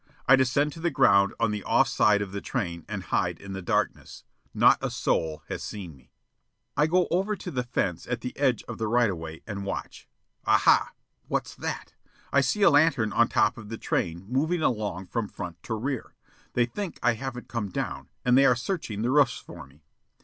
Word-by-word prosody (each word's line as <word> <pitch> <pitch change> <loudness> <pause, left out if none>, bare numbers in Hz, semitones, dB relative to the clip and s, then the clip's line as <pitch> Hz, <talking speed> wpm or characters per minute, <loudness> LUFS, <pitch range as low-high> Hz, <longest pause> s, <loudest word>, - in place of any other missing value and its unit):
I 135 - +8
descend 135 +3 +2
to - - -10
the 170 +1 +1
ground 100 -9 +4
on 115 -2 +2
the 105 -2 -4
off - - +3
side 105 -1 +3
of 95 - -8
the 100 0 -4
train 85 - -3
and - - -4
hide - - -1
in 100 -1 -8
the 95 - -5
darkness. 90 - -2 0.3
Not - - +5
a - - -1
soul 80 -1 -1
has - - -5
seen 90 -7 -7
me. 65 -1 -22 0.7
I 150 - +3
go 180 +2 +2
over 195 +4 +1
to - - -7
the 125 - -1
fence, 95 -8 -2
at 125 -1 -2
the 125 - -5
edge 130 -5 +1
of - - -8
the 110 - -1
right 120 -1 +3
of 90 - -4
way, 80 0 -8
and 100 -2 -5
watch. 100 - -6 0.3
Ah, - - +4
ha! - - +4 0.3
What's - - -2
that? - - -5 0.4
I 140 - +5
see 200 +10 +1
a 195 - +7
lantern 145 -8 +3
on 120 0 +4
top 110 +2 +2
of 105 -2 -10
the 115 - -5
train, 85 -2 -2
moving 155 +8 0
along 105 -5 -1
from 115 +2 -2
front 85 -3 -8
to 110 - -3
rear. 130 +3 -4 0.4
They 120 - +3
think 175 +9 -5
I 120 - +4
haven't 125 +1 -6
come 115 -4 -3
down, - - -4 0.2
and 125 0 +5
they 135 +1 +6
are 125 - +5
searching 120 - -3
the 120 - +1
roofs 140 -3 +4
for - - -11
me. 70 +3 -23
115 Hz, 215 wpm, -27 LUFS, 100-135 Hz, 0.7 s, I